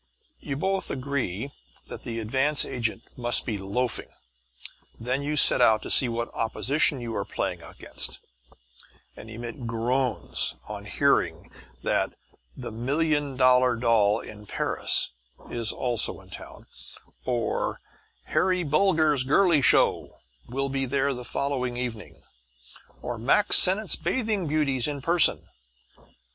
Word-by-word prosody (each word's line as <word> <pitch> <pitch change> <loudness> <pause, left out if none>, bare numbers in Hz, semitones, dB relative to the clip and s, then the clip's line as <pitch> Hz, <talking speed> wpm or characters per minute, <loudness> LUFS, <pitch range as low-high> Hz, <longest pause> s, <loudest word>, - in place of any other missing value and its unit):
You 135 - -5
both 190 +5 -1
agree 135 -3 -3 0.3
that - - -9
the 115 -1 -5
advance 135 +6 +1
agent 115 -2 -2
must 120 -1 +2
be 105 -4 -3
loafing. 110 +6 -1 0.9
Then 125 +4 -2
you 150 +1 -2
set 140 - +6
out 110 -3 +4
to - - -4
see 125 - +3
what 120 0 -3
opposition 135 +5 0
you 115 -2 -5
are - - -1
playing - - -3
against, - - -5 1.0
and 110 - -11
emit 115 +2 -7
groans 120 +3 -1
on - - -7
learning - - +1 0.3
that - - 0 0.4
"The - - -6
Million 145 +4 0
Dollar 125 -1 +5
Doll 115 -3 +2
in 105 -1 -11
Paris" - - 0 0.4
is 115 -2 -1
also 120 -3 -1
in - - -17
town, - - -11 0.6
or 120 -3 -1 0.4
"Harry 185 -1 +1
Bulger's 155 -3 +3
Girly 155 +3 +4
Show" - - +2 0.3
will 135 +3 -2
be 135 0 -1
there 140 +1 +1
the 125 -1 -7
following 125 -2 -2
evening, 120 -4 -6 0.8
or 120 -2 -4
Mack 140 - +3
Sennett's 195 +2 +4
Bathing 200 +1 -1
Beauties 145 -4 +1
in 145 -1 -3
Person. 170 +1 +3
130 Hz, 130 wpm, -26 LUFS, 115-145 Hz, 1.0 s, set